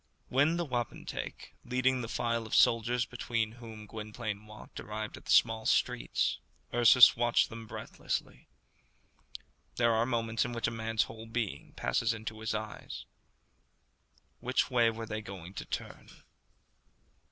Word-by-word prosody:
When 145 Hz, +6 st, +3 dB
the 175 Hz, -, 0 dB
wapentake, 120 Hz, -5 st, -4 dB
leading 130 Hz, +1 st, +1 dB
the 115 Hz, -, -4 dB
file 115 Hz, -1 st, -1 dB
of -, -, -1 dB
soldiers 115 Hz, +1 st, +4 dB
between 115 Hz, -3 st, -2 dB
whom 115 Hz, -2 st, -10 dB
Gwynplaine 105 Hz, -1 st, -6 dB
walked, 105 Hz, 0 st, -11 dB
arrived 110 Hz, 0 st, -5 dB
at -, -, -13 dB
the -, -, -2 dB
small 110 Hz, -1 st, +4 dB
streets, -, -, +1 dB, 0.3 s
Ursus 120 Hz, +1 st, +8 dB
watched 120 Hz, 0 st, +3 dB
them 115 Hz, 0 st, -8 dB
breathlessly. -, -, -5 dB, 1.3 s
There 115 Hz, -1 st, +3 dB
are 115 Hz, +1 st, +2 dB
moments 115 Hz, -2 st, 0 dB
in 120 Hz, -, -4 dB
which 115 Hz, -, -1 dB
a -, -, -1 dB
man's 115 Hz, -1 st, 0 dB
whole 110 Hz, +1 st, -9 dB
being 115 Hz, -9 st, -3 dB
passes 115 Hz, -, 0 dB
into 110 Hz, 0 st, -6 dB
his 110 Hz, 0 st, -2 dB
eyes. 105 Hz, 0 st, -6 dB, 1.3 s
Which 125 Hz, +2 st, 0 dB
way 120 Hz, -2 st, +5 dB
were 115 Hz, 0 st, -5 dB
they 110 Hz, 0 st, -4 dB
going 95 Hz, -3 st, -9 dB
to -, -, -6 dB
turn? -, -, -6 dB
115 Hz, 140 wpm, -31 LUFS, 110-120 Hz, 1.3 s, Ursus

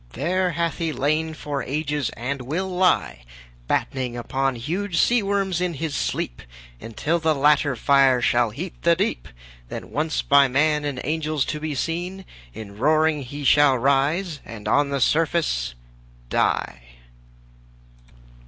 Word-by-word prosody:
There 180 Hz, +6 st, 0 dB
hath 170 Hz, +2 st, -2 dB
he 165 Hz, -2 st, -1 dB
lain 155 Hz, +3 st, -1 dB
for 145 Hz, -2 st, -4 dB
ages 145 Hz, 0 st, -2 dB
and 130 Hz, +3 st, -3 dB
will 160 Hz, +10 st, -3 dB
lie 180 Hz, -, +1 dB, 0.4 s
Battening 125 Hz, -, -1 dB
upon 135 Hz, +2 st, -1 dB
huge 170 Hz, -, -3 dB
seaworms 200 Hz, -5 st, +1 dB
in 180 Hz, -2 st, -1 dB
his 150 Hz, 0 st, -3 dB
sleep, -, -, -3 dB, 0.4 s
Until 150 Hz, -, -2 dB
the 160 Hz, -1 st, +1 dB
latter 145 Hz, -1 st, +3 dB
fire 135 Hz, 0 st, +4 dB
shall 120 Hz, -1 st, +2 dB
heat 160 Hz, -, -6 dB
the 170 Hz, 0 st, +4 dB
deep; 200 Hz, +6 st, -2 dB, 0.4 s
Then -, -, -7 dB
once 155 Hz, +2 st, -1 dB
by 140 Hz, -1 st, +5 dB
man 150 Hz, +3 st, +1 dB
and 140 Hz, -3 st, -3 dB
angels 155 Hz, -1 st, -1 dB
to 150 Hz, -, -5 dB
be 155 Hz, -1 st, -4 dB
seen, 175 Hz, +6 st, -3 dB, 0.3 s
In 100 Hz, -, -10 dB
roaring 155 Hz, +2 st, +2 dB
he 140 Hz, +3 st, -7 dB
shall 140 Hz, -1 st, +5 dB
rise 140 Hz, +6 st, +1 dB
and 105 Hz, -2 st, -9 dB
on 140 Hz, +5 st, +2 dB
the 140 Hz, -1 st, -2 dB
surface 155 Hz, -, +1 dB, 0.6 s
die. 60 Hz, -, 0 dB
150 Hz, 140 wpm, -23 LUFS, 135-165 Hz, 0.6 s, by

